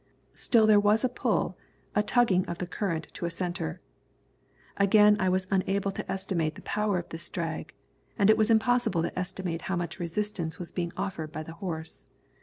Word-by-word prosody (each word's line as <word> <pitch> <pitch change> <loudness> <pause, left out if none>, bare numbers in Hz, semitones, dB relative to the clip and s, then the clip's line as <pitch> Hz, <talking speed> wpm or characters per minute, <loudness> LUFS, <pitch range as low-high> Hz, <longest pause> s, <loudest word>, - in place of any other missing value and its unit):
Still 225 -3 +3
there 215 -1 +6
was 210 +3 +4
a 255 - +3
pull, 245 - 0 0.4
a 210 - +3
tugging 210 -4 +3
of 170 - -4
the 180 - -3
current 170 -3 -3
to - - -4
a - - 0
centre. 175 - -3 1.0
Again 210 +1 +6
I 190 -2 +2
was 185 +1 +1
unable 195 +1 +1
to - - -5
estimate 175 -5 -1
the - - -12
power 210 -2 0
of 175 - -5
this 165 0 -4
drag, 165 -2 -4 0.4
as 200 -3 +4
it 220 - +7
was 220 +1 +2
impossible 225 -6 +3
to 170 - -3
estimate 180 -2 -3
how 190 - +1
much 175 +1 -4
resistance 175 -2 -2
was 175 -3 -7
being 175 -2 -2
offered 160 -5 -3
by 155 0 -5
the 165 - -9
horse. 165 -3 -5
185 Hz, 190 wpm, -28 LUFS, 170-210 Hz, 1.0 s, it